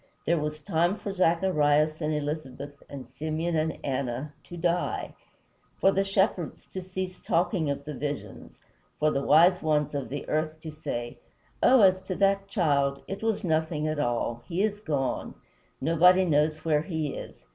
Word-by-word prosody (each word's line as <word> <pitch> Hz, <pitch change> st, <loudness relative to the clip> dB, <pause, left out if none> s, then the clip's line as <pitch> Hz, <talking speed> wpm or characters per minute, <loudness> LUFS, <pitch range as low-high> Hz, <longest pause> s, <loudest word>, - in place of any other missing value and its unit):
There 170 Hz, 0 st, +2 dB
was 150 Hz, 0 st, -3 dB
time 165 Hz, +5 st, +1 dB
for 200 Hz, -, -5 dB
Zacharias 155 Hz, -4 st, +2 dB
and 155 Hz, 0 st, 0 dB
Elisabeth 145 Hz, -2 st, -4 dB
and 135 Hz, -4 st, -8 dB
Simeon 155 Hz, +4 st, -2 dB
and 160 Hz, 0 st, 0 dB
Anna 135 Hz, +1 st, -3 dB
to 175 Hz, -, -9 dB
die; 175 Hz, +1 st, -1 dB, 0.7 s
for 195 Hz, -, +5 dB
the 195 Hz, 0 st, +1 dB
shepherds 195 Hz, -4 st, 0 dB
to 190 Hz, -, -4 dB
cease 185 Hz, 0 st, -5 dB
talking 170 Hz, -2 st, +1 dB
of 140 Hz, -, -3 dB
the 150 Hz, -, -5 dB
visions; 145 Hz, +1 st, -6 dB, 0.4 s
for 155 Hz, 0 st, +3 dB
the 140 Hz, -, 0 dB
wise 175 Hz, +5 st, +5 dB
ones 150 Hz, -2 st, +1 dB
of 140 Hz, -2 st, -3 dB
the 145 Hz, 0 st, -5 dB
earth 155 Hz, +1 st, -1 dB
to 160 Hz, -, -7 dB
say, 120 Hz, -6 st, -5 dB, 0.4 s
"Oh, 255 Hz, -1 st, +6 dB
as 185 Hz, -1 st, +5 dB
to 185 Hz, -, -3 dB
that 195 Hz, 0 st, +2 dB
child, 140 Hz, -8 st, +1 dB
it 195 Hz, -, -5 dB
was 225 Hz, -2 st, 0 dB
nothing 160 Hz, -2 st, 0 dB
at 155 Hz, -1 st, -2 dB
all! 120 Hz, -3 st, -1 dB
He 180 Hz, +3 st, 0 dB
is 210 Hz, -1 st, 0 dB
gone. 145 Hz, -9 st, -2 dB, 0.4 s
Nobody 180 Hz, +5 st, +5 dB
knows 155 Hz, -1 st, +1 dB
where 150 Hz, -2 st, +3 dB
he 160 Hz, -5 st, -3 dB
is. -, -, -9 dB
155 Hz, 170 wpm, -27 LUFS, 145-180 Hz, 0.7 s, Oh